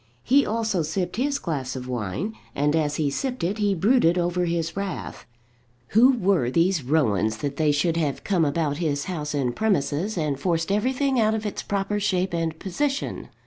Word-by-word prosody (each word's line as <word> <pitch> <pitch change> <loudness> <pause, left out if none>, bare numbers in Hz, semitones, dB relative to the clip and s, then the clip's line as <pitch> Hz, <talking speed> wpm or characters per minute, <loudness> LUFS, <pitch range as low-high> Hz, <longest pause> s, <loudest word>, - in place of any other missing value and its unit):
He 275 +3 +4
also 220 -5 0
sipped 175 +6 -2
his 280 +3 +1
glass 140 - -3
of 125 -1 -6
wine, 125 - -3 0.2
and 145 +2 +2
as 150 -2 +1
he 150 -2 0
sipped 255 - -3
it 195 +5 -1
he 205 -2 +2
brooded 190 -2 +3
over 175 0 0
his 165 -1 -2
wrath. 195 -2 -5 0.6
Who 245 +5 +6
were 185 - +2
these 170 +4 +2
Rowans 110 -7 +1
that 140 +4 -4
they 155 -2 +3
should 160 +3 +1
have 150 -4 -1
come 185 -5 +1
about 145 -1 0
his 150 -4 -1
house 150 -5 -4
and 125 -4 -1
premises, 190 -1 0
and 150 -4 -1
forced 165 +3 0
everything 255 +5 +1
out 220 0 +3
of 220 0 -4
its 210 - -3
proper 200 +1 -1
shape 190 -3 0
and 165 -1 -1
position? 275 - -2
170 Hz, 185 wpm, -24 LUFS, 150-205 Hz, 0.6 s, Who